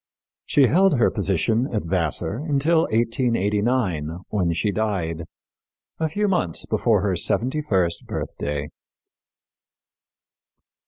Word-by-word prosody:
She 140 - +4
held 180 +2 +3
her 120 - +3
position 105 +5 0
at 105 - -1
Vassar 85 +2 -1
until 155 +2 +2
1889, 105 - 0
when 95 -5 0
she 100 +5 0
died, 90 -7 -2 0.7
a 160 -1 0
few 205 +6 0
months 95 - 0
before 105 -5 +1
her 100 -3 +1
seventy 130 - 0
first 95 - 0
birthday. 75 +1 -4
105 Hz, 105 wpm, -23 LUFS, 85-130 Hz, 0.7 s, She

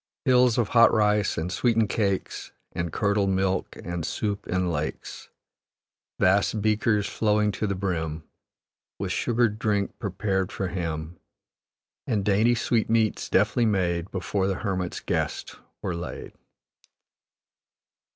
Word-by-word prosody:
Hills 125 -2 +4
of 115 -4 +1
hot 115 -1 +6
rice, 105 -2 +2
and 85 +3 -2
sweetened 110 +2 +2
cakes, 100 -4 -2 0.2
And 85 -1 -3
curdled 100 0 +1
milk, 95 0 0
and 85 -1 -4
soup 100 +4 -3
in 90 -1 0
lakes. 75 -1 -5 0.9
Vast 100 +3 +3
beakers 105 0 +1
flowing 105 -1 +1
to 105 - -2
the 100 - -1
brim, 80 -5 -3 0.7
With - - -3
sugared 115 -3 +1
drink 100 -3 -1
prepared 95 -2 -1
for 95 - -3
him; 80 -2 -4 0.9
And 105 -6 0
dainty 110 +4 +3
sweetmeats, 115 -1 +1
deftly 110 +4 +3
made, 90 -3 0
Before 95 +1 -1
the 95 - 0
hermit's 90 -3 -2
guest - - -3 0.3
were 90 - -1
laid." 85 +1 -6
100 Hz, 120 wpm, -26 LUFS, 90-110 Hz, 0.9 s, hot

